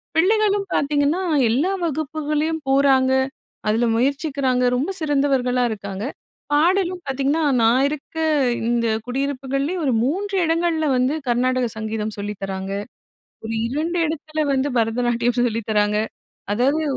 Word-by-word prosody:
பிள்ளைகளும் 405 Hz, +2 st, +2 dB
பாத்தீங்கன்னா, 290 Hz, +4 st, +1 dB, 0.3 s
எல்லா 290 Hz, +12 st, +1 dB
வகுப்புகளையும் 310 Hz, +1 st, -1 dB
போறாங்க, 270 Hz, -1 st, +4 dB, 0.6 s
அதுல 225 Hz, +3 st, +2 dB
முயற்சிக்கிறாங்க, 270 Hz, -1 st, 0 dB
ரொம்ப 285 Hz, +10 st, -1 dB
சிறந்தவர்களா 275 Hz, -4 st, +1 dB
இருக்காங்க. 200 Hz, 0 st, -5 dB, 0.5 s
பாடலும் 360 Hz, +3 st, +2 dB
பாத்தீங்கன்னா, 275 Hz, +4 st, 0 dB, 0.2 s
நான் 245 Hz, +5 st, +4 dB
இருக்க 300 Hz, +2 st, -7 dB, 0.5 s
இந்த 235 Hz, -1 st, +1 dB, 0.2 s
குடியிருப்புகள்லே 275 Hz, +4 st, -2 dB
ஒரு 260 Hz, -, +2 dB
3 390 Hz, +9 st, -1 dB
இடங்கள்ல 325 Hz, -1 st, +1 dB
வந்து 255 Hz, +5 st, +1 dB
கர்நாடக 250 Hz, 0 st, +1 dB
சங்கீதம் 220 Hz, -1 st, -3 dB
சொல்லித்தராங்க. 195 Hz, -1 st, -4 dB, 0.7 s
ஒரு 225 Hz, -, -4 dB, 0.2 s
2 320 Hz, +6 st, -2 dB
இடத்துல 310 Hz, 0 st, -3 dB
வந்து 270 Hz, +1 st, +1 dB
பரதநாட்டியம் 240 Hz, +1 st, +1 dB
சொல்லித்தராங்க. 210 Hz, -2 st, 0 dB, 0.6 s
அதாவது 275 Hz, +7 st, +2 dB
275 Hz, 105 wpm, -21 LUFS, 240-315 Hz, 0.7 s, போறாங்க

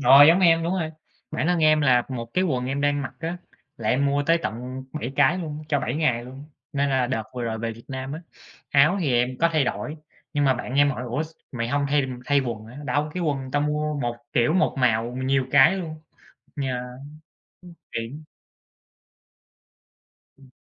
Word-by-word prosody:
rồi 135 Hz, +2 st, +9 dB
giống 170 Hz, +4 st, +6 dB
em, 165 Hz, -2 st, +5 dB
đúng 170 Hz, +2 st, -1 dB
rồi. 165 Hz, -4 st, -2 dB, 0.4 s
Bản 135 Hz, -, -1 dB
thân 175 Hz, -1 st, +2 dB
em 155 Hz, -1 st, +5 dB
là 125 Hz, -4 st, +4 dB
1 125 Hz, -3 st, -4 dB
cái 185 Hz, -, +3 dB
quần 130 Hz, -8 st, -1 dB
em 135 Hz, +2 st, -2 dB
đang 145 Hz, 0 st, +1 dB
mặc 130 Hz, -, -6 dB
á, 165 Hz, +2 st, -3 dB, 0.4 s
là 110 Hz, -1 st, -3 dB
em 140 Hz, +4 st, +2 dB
mua 140 Hz, +1 st, +1 dB
tới 165 Hz, +3 st, +3 dB
tận 125 Hz, +4 st, -5 dB
7 135 Hz, -4 st, -4 dB
cái 185 Hz, -, +4 dB
luôn, 155 Hz, -3 st, -5 dB
cho 145 Hz, -3 st, +1 dB
7 125 Hz, -, -2 dB
ngày 130 Hz, -7 st, +1 dB
luôn. 135 Hz, +3 st, -10 dB, 0.3 s
Nên 140 Hz, 0 st, +1 dB
là 130 Hz, -2 st, +2 dB
đợt 120 Hz, -3 st, -1 dB
vừa 125 Hz, -, -3 dB
rồi 115 Hz, -1 st, -2 dB
về 115 Hz, 0 st, -3 dB
Việt 115 Hz, +1 st, -14 dB
Nam 130 Hz, 0 st, -5 dB
á, 155 Hz, -, -5 dB, 0.5 s
áo 150 Hz, +6 st, +5 dB
thì 145 Hz, -7 st, +1 dB
em 125 Hz, +1 st, +1 dB
có 170 Hz, -, +5 dB
thay 155 Hz, -3 st, +3 dB
đổi, 150 Hz, +5 st, -3 dB, 0.4 s
nhưng 145 Hz, -1 st, +1 dB
mà 135 Hz, -1 st, +4 dB
bạn 125 Hz, +1 st, -5 dB
em 145 Hz, 0 st, +5 dB
hỏi: 125 Hz, -, -4 dB
"Ủa, 125 Hz, +5 st, -2 dB
s 160 Hz, -, -7 dB, 0.2 s
mày 115 Hz, -1 st, -2 dB
hông 140 Hz, +2 st, +1 dB
thay 145 Hz, -2 st, +2 dB, 0.2 s
thay 145 Hz, -1 st, +3 dB
quần 115 Hz, -4 st, -4 dB
hả?" 120 Hz, -, -12 dB
Đâu, 145 Hz, +3 st, 0 dB
cái 180 Hz, -, -2 dB
quần 135 Hz, -5 st, -2 dB
tao 145 Hz, +2 st, +1 dB
mua 150 Hz, 0 st, -1 dB
1 120 Hz, -1 st, -2 dB, 0.2 s
kiểu, 120 Hz, +6 st, +3 dB
1 185 Hz, -, +2 dB
màu 120 Hz, -2 st, +2 dB
nhiều 130 Hz, 0 st, +1 dB
cái 145 Hz, +6 st, +6 dB
luôn. 165 Hz, -4 st, -5 dB, 0.7 s
Yeah. 130 Hz, -2 st, -1 dB
Ưm, 125 Hz, +2 st, -10 dB, 0.9 s
tiện. 115 Hz, +7 st, -5 dB, 2.1 s
Ừm. 135 Hz, -2 st, -19 dB
140 Hz, 210 wpm, -24 LUFS, 125-150 Hz, 2.1 s, rồi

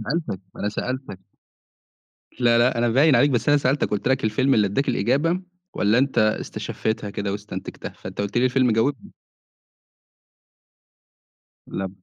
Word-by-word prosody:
ما 110 Hz, -, -6 dB
أنا 165 Hz, -, +1 dB
سألتَك، 95 Hz, -, -4 dB
ما -, -, -10 dB
أنا 105 Hz, -, 0 dB
سألتَك. 125 Hz, -2 st, -5 dB, 1.2 s
لا، 120 Hz, -1 st, +4 dB
لأ 120 Hz, 0 st, +3 dB
أنا 120 Hz, 0 st, +2 dB
باين 135 Hz, +3 st, +4 dB
عليك 145 Hz, +4 st, +4 dB
بس 120 Hz, 0 st, 0 dB
أنا 145 Hz, 0 st, +5 dB
سألتَك، 140 Hz, +1 st, +1 dB
قُلت 105 Hz, +3 st, -1 dB
لَك 130 Hz, -3 st, +1 dB
الفيلم 130 Hz, +5 st, +2 dB
اللي 105 Hz, -2 st, +3 dB
أداك 120 Hz, +9 st, -1 dB
الإجابة، 165 Hz, +8 st, +1 dB, 0.3 s
والّا 105 Hz, +3 st, +2 dB
أنت 135 Hz, +1 st, +1 dB
استشفيتها 110 Hz, 0 st, -1 dB
كده 100 Hz, 0 st, -3 dB
واستنتجها، 105 Hz, +1 st, -7 dB
فأنت -, -, -8 dB
قُلت 100 Hz, +4 st, -1 dB
لي 125 Hz, -, +3 dB
الفيلم 130 Hz, -1 st, +3 dB
جاوبني. 115 Hz, +3 st, 0 dB, 2.6 s
لأ. 95 Hz, 0 st, -4 dB
120 Hz, 155 wpm, -23 LUFS, 105-135 Hz, 2.6 s, أنا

